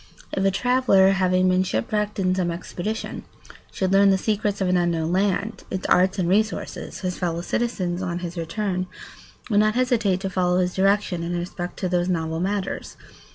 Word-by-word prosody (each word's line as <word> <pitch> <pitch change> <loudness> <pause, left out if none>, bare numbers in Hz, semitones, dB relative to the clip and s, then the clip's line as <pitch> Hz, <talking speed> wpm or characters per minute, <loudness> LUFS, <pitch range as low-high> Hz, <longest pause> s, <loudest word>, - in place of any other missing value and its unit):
If 195 - -1
a 195 - +4
traveller, 200 -2 +4
having 185 -1 +2
been 185 0 +3
shipwrecked 205 - -1
in 185 -2 +1
some 185 -2 0
expedition, 180 +5 -4 0.5
should 190 -1 -1
learn 200 0 +6
the 190 - +4
secrets 210 0 -1
of 190 - 0
an 180 - +2
unknown 170 -2 +1
land, 200 +3 0
its 190 - -4
arts 185 +2 +3
and 180 -3 0
resources, 215 +4 -1
his 180 -2 -3
fellow 170 -2 -1
citizens, 185 -4 -2
on 175 -2 -2
his 175 -1 -5
return, 185 +2 -2 0.6
would 205 - +4
not 215 +1 +3
hesitate 235 -7 +2
to 195 - -2
follow 180 -1 +1
his 180 0 +1
direction 195 -2 +1
in 175 +1 -2
respect 175 0 -5
to 185 - -1
those 180 0 0
novel 160 -2 -1
matters. 195 +1 -3
185 Hz, 180 wpm, -23 LUFS, 175-200 Hz, 0.6 s, learn